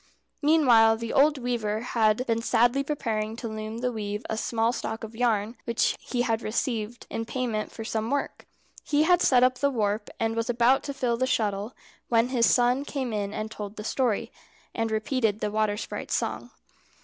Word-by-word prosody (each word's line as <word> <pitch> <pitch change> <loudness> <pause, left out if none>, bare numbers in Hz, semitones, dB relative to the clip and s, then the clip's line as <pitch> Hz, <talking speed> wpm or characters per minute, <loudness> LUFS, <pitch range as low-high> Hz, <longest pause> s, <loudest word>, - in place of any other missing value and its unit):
Meanwhile 245 -8 +5
the 230 0 -5
old 295 +2 +4
weaver 230 -4 -2
had 230 0 +1
been 230 -2 0
sadly 240 +3 +3
preparing 225 -7 -2
the 235 0 -5
loom 220 +1 -5
to 250 0 0
weave 210 -1 -4
a 220 - -2
small 225 +1 0
stock 225 -2 -4
of 225 0 -8
yarn, 225 -1 0
which 235 -1 +1
he 245 -1 -2
had 230 -2 0
received 230 0 -2
in 225 - -2
payment 230 -2 -3
for 225 - -7
some 220 0 -2
work. 285 +1 -3 0.4
He 295 0 +2
had 355 +2 +4
set 250 -2 +5
up 255 0 +3
the 280 - +3
warp, 210 -4 -1
and 225 0 0
was 230 +1 -2
about 240 +2 +3
to 280 - -3
fill 245 -3 0
the 255 +2 0
shuttle, 210 -1 -1 0.3
when 230 +1 +3
his 240 -3 +3
son 245 +2 +3
came 265 -5 -3
in 205 -1 -2
and 215 +1 -4
told 210 -1 -7
the 210 - -7
story, 235 -1 0 0.4
and 225 -1 -1
repeated 220 -1 0
the 210 - -2
water 215 -1 0
sprite's - - -4
song. - - -3
230 Hz, 190 wpm, -26 LUFS, 220-250 Hz, 0.4 s, Meanwhile